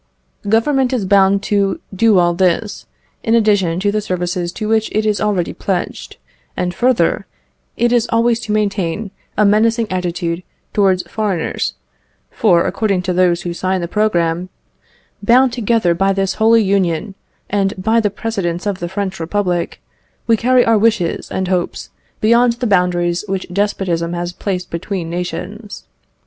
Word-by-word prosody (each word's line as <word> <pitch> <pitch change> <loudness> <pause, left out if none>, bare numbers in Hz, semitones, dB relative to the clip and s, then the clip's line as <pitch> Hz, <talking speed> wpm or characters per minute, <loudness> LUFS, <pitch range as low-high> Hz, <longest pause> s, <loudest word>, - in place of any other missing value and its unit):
Government 260 +4 +2
is 230 -6 0
bound 195 0 +3
to 200 -2 0
do 215 +1 +4
all 175 -1 +3
this, 185 +4 0 0.3
in 230 0 +1
addition 205 -6 +2
to 205 +1 +1
the 215 +1 0
services 180 -2 -2
to 215 - -4
which 220 0 +1
it 215 0 +1
is 210 -1 0
already 205 -5 0
pledged; 185 -3 -4 0.4
and 180 0 -1
further, 220 -3 +1 0.5
it 240 +1 +2
is 240 -2 +2
always 230 0 +2
to 215 - -5
maintain 200 -2 -1 0.3
a 210 - +4
menacing 225 +3 +3
attitude 175 -1 -2 0.3
towards 190 -3 +2
foreigners; 200 -6 -2 0.6
for, 175 -6 +3
according 200 -5 0
to 185 0 -1
those 175 -1 +2
who 175 - -3
sign 185 +2 -1
the 170 - -3
programme, 175 -4 0 0.7
"Bound 245 +4 +4
together 225 -6 +1
by 195 +3 +1
this 195 0 0
holy 225 0 +5
union, 195 -1 0 0.3
and 200 0 0
by 220 +5 +2
the 210 -2 +1
precedents 195 -4 -3
of 200 -2 -2
the 175 - -4
French 195 0 -3
Republic, 175 0 -2 0.4
we 230 - +4
carry 250 +3 +3
our 225 -2 +3
wishes 215 -6 0
and 190 -1 -2
hopes 180 -1 -2 0.3
beyond 235 +2 +4
the 245 +1 -4
boundaries 180 -3 +1
which 190 -1 -2
despotism 180 -4 -1
has 175 0 -3
placed 180 -1 -4
between 170 0 -4
nations. 200 +4 -5
195 Hz, 155 wpm, -17 LUFS, 180-220 Hz, 0.7 s, holy